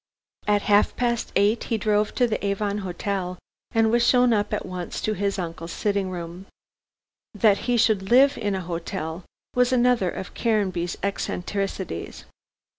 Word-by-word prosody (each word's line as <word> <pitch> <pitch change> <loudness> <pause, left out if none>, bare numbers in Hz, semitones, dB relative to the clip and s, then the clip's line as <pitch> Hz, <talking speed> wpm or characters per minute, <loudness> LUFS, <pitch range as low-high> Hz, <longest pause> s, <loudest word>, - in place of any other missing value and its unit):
At 205 -1 +2
half 205 0 +3
past 240 -1 -1
eight 205 +3 +2
he 225 - 0
drove 210 0 +1
to 250 - +3
the 220 -3 -2
Avon 200 +1 -1
Hotel 185 -1 -3 0.3
and 225 -1 +2
was 235 0 +3
shown 250 -1 +4
up 205 -1 0
at - - -2
once 180 -1 -5
to 215 - 0
his 200 0 -1
uncle's 165 -2 -5
sitting 200 -1 -1
room. 175 +1 -7 0.9
That 205 -1 +4
he 245 - +3
should 215 -4 +2
live 270 +3 +6
in 205 -3 -1
an 190 - -2
hotel 170 0 -5 0.3
was 250 0 +3
another 245 -6 +3
of 190 - -7
Caranby's 190 -6 0
eccentricities. 195 - -3
200 Hz, 155 wpm, -24 LUFS, 185-225 Hz, 0.9 s, live